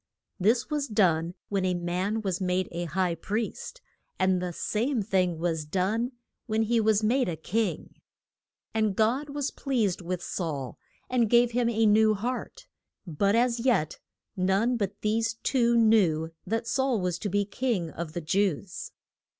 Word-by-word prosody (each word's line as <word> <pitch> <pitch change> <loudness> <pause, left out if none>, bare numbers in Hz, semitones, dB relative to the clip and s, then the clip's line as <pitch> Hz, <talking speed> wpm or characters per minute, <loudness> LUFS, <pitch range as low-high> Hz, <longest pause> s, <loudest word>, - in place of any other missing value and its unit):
This 230 +6 +2
was 295 -2 0
done 175 -6 +2
when 195 -2 0
a 185 -1 +1
man 180 +5 -2
was 190 -2 -2
made 185 0 0
a 175 +1 -3
high 175 +2 0
priest; 215 - -4 0.4
and 185 -1 +2
the 180 -1 -2
same 225 - -1
thing 185 -4 +1
was 165 -1 -1
done 200 - -1 0.3
when 220 0 +1
he 230 +1 +2
was 215 -1 +2
made 245 +1 +2
a 170 - -2
king. 210 +8 -2 0.8
And 215 -3 +1
God 245 +7 +1
was 285 -1 -2
pleased 225 -10 -1
with 180 0 -4
Saul, 145 -8 -4 0.3
and 240 -3 +1
gave 240 +1 +5
him 235 0 +1
a 225 -1 +2
new 215 0 +5
heart; 245 +5 -4 0.4
but 195 +5 +1
as 240 0 +2
yet 230 -11 +1 0.4
none 195 +6 +2
but 205 -2 -3
these 225 +1 0
two 235 -3 +3
knew 185 -9 +3 0.2
that 225 +3 -1
Saul 260 -1 +1
was 180 -2 -2
to 205 - -3
be 205 +1 +1
King 205 -7 -2
of 165 -1 -6
the 175 - -3
Jews. 185 +2 -1
205 Hz, 160 wpm, -27 LUFS, 180-230 Hz, 0.8 s, gave